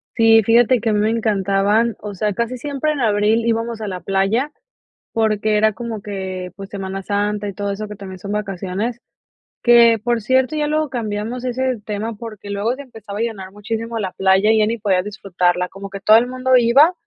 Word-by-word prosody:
Sí, 225 Hz, -1 st, +6 dB
fíjate 235 Hz, +3 st, +4 dB
que 225 Hz, -, -1 dB
a -, -, +2 dB
mí 210 Hz, -, +2 dB
me 215 Hz, -, +2 dB
encantaban, 210 Hz, 0 st, +1 dB
o 210 Hz, -1 st, -7 dB
sea, 205 Hz, +2 st, -1 dB
casi 235 Hz, +5 st, -2 dB
siempre 290 Hz, +2 st, -1 dB
en 295 Hz, -, -3 dB
abril 220 Hz, 0 st, +2 dB
íbamos 230 Hz, 0 st, -1 dB
a 215 Hz, -, -3 dB
la 185 Hz, -2 st, -4 dB
playa, 195 Hz, +10 st, 0 dB, 0.6 s
porque 215 Hz, -1 st, +1 dB
era 215 Hz, +1 st, +4 dB
como 225 Hz, -1 st, -6 dB
que, 190 Hz, -2 st, -5 dB
pues, 195 Hz, -1 st, -8 dB
Semana 195 Hz, -1 st, -5 dB
Santa 205 Hz, +1 st, -1 dB
y 200 Hz, -, -5 dB
todo 200 Hz, +1 st, -3 dB
eso 210 Hz, +2 st, -5 dB
que 210 Hz, -, -8 dB
también 190 Hz, -2 st, -9 dB
son 200 Hz, +2 st, -5 dB
vacaciones, 210 Hz, +3 st, -3 dB, 0.6 s
que 235 Hz, -2 st, +6 dB
por 235 Hz, 0 st, 0 dB
cierto, 260 Hz, +6 st, +2 dB
ya 300 Hz, -1 st, 0 dB
luego 305 Hz, 0 st, 0 dB
cambiamos 230 Hz, 0 st, -4 dB
ese 255 Hz, -2 st, -1 dB
tema 215 Hz, +2 st, -3 dB
porque 215 Hz, -2 st, -9 dB
luego 205 Hz, +5 st, -1 dB
se 285 Hz, -, -9 dB
empezaba 220 Hz, -5 st, -9 dB
a -, -, +1 dB
llenar 195 Hz, -5 st, -5 dB
muchísimo 225 Hz, +2 st, -4 dB
la 190 Hz, -3 st, -3 dB
playa 190 Hz, +2 st, +3 dB
y 220 Hz, -, +4 dB
ya 215 Hz, -, +4 dB
ni 230 Hz, +2 st, -1 dB
podías 195 Hz, -4 st, +1 dB
disfrutarla, 180 Hz, -3 st, -1 dB
como 195 Hz, +2 st, -9 dB
que 195 Hz, 0 st, -7 dB
todo 215 Hz, +3 st, +5 dB
el 235 Hz, +2 st, +5 dB
mundo 255 Hz, +1 st, +1 dB
iba 255 Hz, +8 st, +5 dB
215 Hz, 205 wpm, -19 LUFS, 200-235 Hz, 0.6 s, Sí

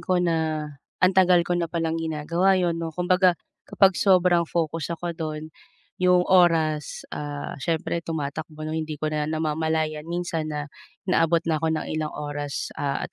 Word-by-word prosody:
ko 180 Hz, +2 st, 0 dB
na 175 Hz, -2 st, +2 dB, 0.7 s
antagal 185 Hz, -2 st, +5 dB
ko 175 Hz, -, -2 dB
na 175 Hz, -1 st, 0 dB
palang 165 Hz, -1 st, -1 dB
ginagawa 170 Hz, +4 st, +1 dB
'yun, 170 Hz, -2 st, 0 dB
'no, 165 Hz, -, -2 dB
kumbaga 180 Hz, 0 st, +3 dB, 0.3 s
kapag 195 Hz, -1 st, +5 dB
sobrang 180 Hz, -3 st, +3 dB
focus 165 Hz, -2 st, -1 dB
ako 175 Hz, 0 st, -4 dB
do'n, 155 Hz, -1 st, -5 dB, 0.5 s
'yung 180 Hz, -1 st, +4 dB
oras, 165 Hz, -5 st, +2 dB
ah, 145 Hz, -1 st, -5 dB
siyempre 165 Hz, +3 st, -1 dB
tumatakbo 155 Hz, -1 st, -5 dB
'no, 155 Hz, -, -4 dB
hindi 155 Hz, -1 st, -3 dB
ko 155 Hz, +1 st, -3 dB
na 150 Hz, 0 st, -1 dB
namamalayan 155 Hz, 0 st, -1 dB
minsan 170 Hz, -2 st, -2 dB
na 150 Hz, -1 st, -3 dB, 0.4 s
inaabot 170 Hz, -3 st, +2 dB
na 160 Hz, -2 st, 0 dB
ako 160 Hz, -, 0 dB
ng -, -, -4 dB
ilang 155 Hz, -1 st, -2 dB
oras, 145 Hz, -1 st, -4 dB
ah, 140 Hz, -1 st, -1 dB
at -, -, -9 dB
165 Hz, 160 wpm, -25 LUFS, 155-175 Hz, 0.7 s, antagal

